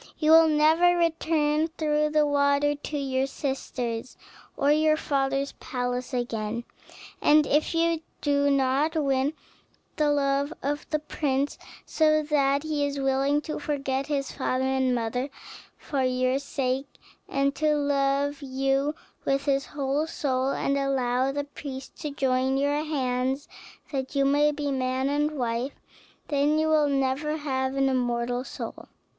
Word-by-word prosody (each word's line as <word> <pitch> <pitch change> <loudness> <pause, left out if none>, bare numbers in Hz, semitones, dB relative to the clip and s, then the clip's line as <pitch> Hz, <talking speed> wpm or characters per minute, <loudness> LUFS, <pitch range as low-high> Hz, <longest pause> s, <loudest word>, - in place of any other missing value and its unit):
You 310 0 +2
will 325 0 +8
never 320 +3 +4
return 315 -2 +1
through 300 -2 0
the 305 0 +3
water 285 0 +2
to 290 +1 -5
your 265 -1 0
sisters, 255 -3 -4 0.4
or 280 - +2
to 295 - +6
your 310 0 +3
father's 275 -2 0
palace 250 0 -3
again; 235 -2 -2 0.6
and 300 0 +5
if 300 +4 +1
you 330 -1 +2 0.2
do 285 -1 +2
not 275 +3 +2
win 275 -1 +1 0.6
the 300 -2 +2
love 280 0 +1
of 290 +2 -3
the 305 - +1
prince, 285 -2 -2 0.3
so 310 -1 +3
that 280 -1 +1
he 305 -2 -1
is 285 0 -2
willing 270 +2 +1
to 305 - -5
forget 275 -2 -2
his 280 -2 -2
father 260 -1 -1
and 265 -1 +1
mother 245 +3 -2 0.5
for 280 -2 -3
your 255 +1 +1
sake, 270 -1 -2 0.4
and 275 0 +1
to 305 -1 +2
love 285 0 0
you 270 +2 0 0.3
with 275 0 0
his 275 -1 +1
whole 285 +2 -1
soul, 270 -5 -1
and 275 0 0
allow 260 -1 +1
the 285 +1 -2
priest 275 -2 -8
to 300 - -4
join 265 -1 +1
your 290 +2 +1
hands 265 -2 -1 0.4
that 265 -1 -3
you 275 0 +3
may 290 +2 +4
be 290 -1 -3
man 260 0 0
and 295 +1 +1
wife, 245 +2 -1 0.6
then 290 +1 +2
you 315 0 +1
will 305 -2 +3
never 275 +3 0
have 265 -3 -2
an 270 0 +2
immortal 245 -1 0
soul. - - -7
280 Hz, 150 wpm, -26 LUFS, 265-295 Hz, 0.6 s, will